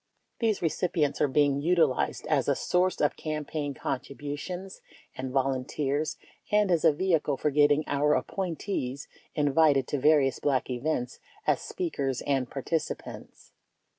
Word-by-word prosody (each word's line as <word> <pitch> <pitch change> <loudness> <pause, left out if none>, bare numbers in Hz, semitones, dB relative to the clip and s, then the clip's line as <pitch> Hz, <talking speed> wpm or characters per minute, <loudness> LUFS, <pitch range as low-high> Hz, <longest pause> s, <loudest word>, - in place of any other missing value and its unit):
These 220 -5 +1
recipients 160 -3 0
are - - +4
being 140 0 +2
utilized 160 -5 +1
as - - +1
a - - +3
source 180 +1 +1
of 145 - +2
campaign 150 -2 -4
contributions 145 +8 -5 0.3
and 130 0 -4
volunteers 135 +2 -1 0.3
and 210 -2 +3
as 170 -2 +2
a - - +7
vehicle 155 -3 +1
for 150 - 0
getting 145 +1 +4
our 145 +1 +2
appointees 165 -7 -3 0.3
invited 145 -2 +3
to 145 - -1
various 145 -2 +3
Black 135 -3 0
events 125 -1 -2 0.3
as - - +2
speakers 140 - -3
and 135 -3 0
participants. 155 +4 -5
145 Hz, 130 wpm, -28 LUFS, 135-165 Hz, 0.3 s, a